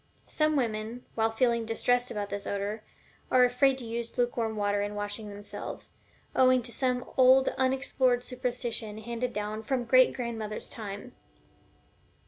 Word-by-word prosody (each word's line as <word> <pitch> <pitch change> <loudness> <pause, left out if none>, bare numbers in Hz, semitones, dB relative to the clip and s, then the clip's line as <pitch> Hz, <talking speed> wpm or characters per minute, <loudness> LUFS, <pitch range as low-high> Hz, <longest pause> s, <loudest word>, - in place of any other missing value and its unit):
Some 310 0 +1
women, 230 -1 -2
while 225 0 +2
feeling 235 0 +1
distressed 245 +2 +1
about 205 -2 -4
this 200 0 -4
odor, 200 +2 -3 0.5
are 250 -1 +6
afraid 260 +2 +3
to 250 - -7
use 230 +1 -5
lukewarm 240 -2 0
water 205 -1 +1
in 205 0 -3
washing 205 +1 -4
themselves, 205 0 -7 0.4
owing 255 -1 +5
to 235 - -6
some 250 0 0
old 260 +1 +6
unexplored 260 -1 +1
superstition 245 -4 -3
handed 235 +2 -3
down 210 0 -3
from 255 +3 -1
the - - -6
great 255 +2 +5
grandmother's 225 -4 -4
time. 215 +2 -7
235 Hz, 145 wpm, -29 LUFS, 215-250 Hz, 0.5 s, are